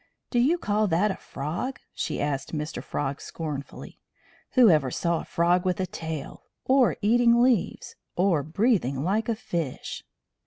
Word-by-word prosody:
"Do 245 - +2
you 290 +9 +3
call 210 -7 +1
that 185 +4 +2
a - - -3
frog?" 170 - -5
she - - -3
asked 145 +2 -2
Mr. 150 +1 -4
Frog 140 -1 -3
scornfully. 150 -4 -7 0.5
"Whoever 170 - +5
saw 170 +5 0
a - - -10
frog 175 +1 +2
with 185 -1 0
a 190 - +1
tail? 160 -5 -6 0.2
Or 260 -2 +4
eating 235 +2 +5
leaves? 245 -7 0 0.2
Or 180 -4 +2
breathing 155 - +1
like 215 +6 0
a 230 - +1
fish?" 165 -9 -4
180 Hz, 150 wpm, -26 LUFS, 150-225 Hz, 0.5 s, Whoever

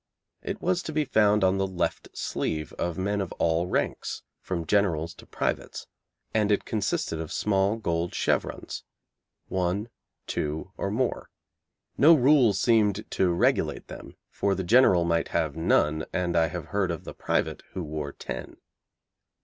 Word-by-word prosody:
It - - -4
was 180 -1 +1
to 160 - -5
be 155 -1 0
found 105 -5 +3
on 95 +1 +3
the 95 - +1
left 95 -2 -2
sleeve 75 -1 -2
of 85 -2 -3
men 100 +2 0
of 95 - -4
all 85 +1 +1
ranks, - - -2 0.2
from 85 -3 -4
generals 85 -3 +1
to - - -15
privates, - - -3 0.5
and 105 -1 +2
it 105 - +1
consisted 100 -6 -1
of 80 - -6
small 100 0 +1
gold 85 -6 -2
chevrons, - - -1 0.6
one, 95 +4 -1 0.4
two, 75 +4 -3
or 100 - -2
more. 120 +5 -1 0.7
No 160 +5 +8
rule 130 -5 +5
seemed 105 0 +2
to 95 -2 +2
regulate 85 - +1
them, - - -10 0.2
for 100 -1 0
the 95 - -2
general 95 -3 +5
might 85 -1 +1
have 80 -3 -1
none, 80 -1 +2
and 90 -2 -1
I 80 -1 +4
have 90 -1 -5
heard 100 -3 0
of 85 -2 -4
the - - -8
private - - -1
who 90 - -3
wore 75 -2 -4
ten. - - -7
95 Hz, 155 wpm, -27 LUFS, 85-105 Hz, 0.7 s, No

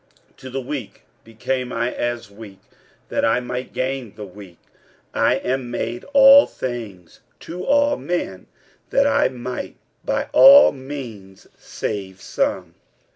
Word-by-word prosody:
46:009:022 - - -39
To 130 - -10
the 135 +1 -4
weak 130 -5 -7 0.2
became 125 +3 -4
I 120 +2 -2
as 120 -3 -4
weak, 100 -1 -12 0.5
that - - -1
I 115 +2 +3
might 125 +1 -6
gain 130 -4 -4
the 105 - -8
weak: 95 -2 -13 0.6
I - - +2
am 130 -1 -3
made 120 0 -4
all 275 0 +8
things 110 -9 -7 0.2
to 180 +2 -7
all 285 +3 +2
men, 95 - -4 0.4
that - - +2
I - - +3
might 125 0 -6 0.3
by - - -2
all 280 +1 +9
means 125 -9 -9
save 95 -3 -6
some. 90 -2 -2
120 Hz, 135 wpm, -21 LUFS, 105-135 Hz, 0.6 s, all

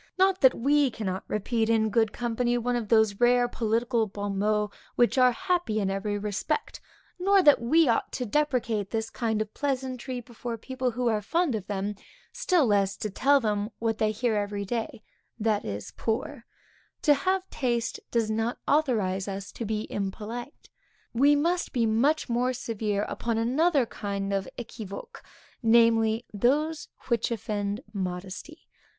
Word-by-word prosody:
Not 380 0 +3
that 260 -2 +6
we 285 +2 +3
cannot 195 -5 -4
repeat 220 +2 0
in 220 -1 +2
good 220 0 +2
company 240 +1 0
one 245 +1 -1
of 235 -3 -2
those 220 -3 +3
rare 245 0 +4
political 230 0 0
bon 200 -1 -4
mots 210 0 0 0.2
which 240 - +3
are 250 0 +6
happy 350 - 0
in 195 -2 0
every 205 +1 -2
respect; 210 - -3 0.4
nor 390 +1 +4
that 290 -6 +6
we 315 +7 +4
ought 230 - +1
to 250 - -2
deprecate 235 -6 0
this 225 -1 -3
kind 220 -3 0
of 215 - -19
pleasantry 260 -2 -3
before 235 0 -6
people 260 +2 -2
who 245 +1 -2
are 215 -2 0
fond 330 - 0
of 205 -3 -4
them, 200 0 -2 0.4
still 350 -6 +2
less 200 -3 +2
to 215 - -4
tell 280 +7 +4
them 210 -3 -1
what 225 -1 -1
they 215 - +2
hear 225 +2 0
every 205 -1 -2
day, 225 +1 -4 0.4
That 215 -1 0
is 100 0 -5
poor; 235 +3 -3 0.6
to 295 - +6
have 370 +6 0
taste, 240 -4 -1
does 225 -2 0
not 225 +2 -1
authorize 215 -11 +1
us 195 -1 -5
to 230 - -5
be 215 0 -2
impolite. 220 +6 -5 0.5
We 280 +5 +5
must 340 +5 0
be 240 -4 +2
much 265 +8 +2
more 245 +2 +1
severe 215 -4 -2
upon 230 +1 -2
another 270 +5 +2
kind 200 -2 -4
of 195 -1 -1
équivoques; 240 - -8 0.4
namely, 225 -1 +4
those 295 +9 +1 0.2
which 235 -2 +1
offend 205 -1 -3
modesty. 190 - -6
230 Hz, 160 wpm, -27 LUFS, 210-255 Hz, 0.6 s, that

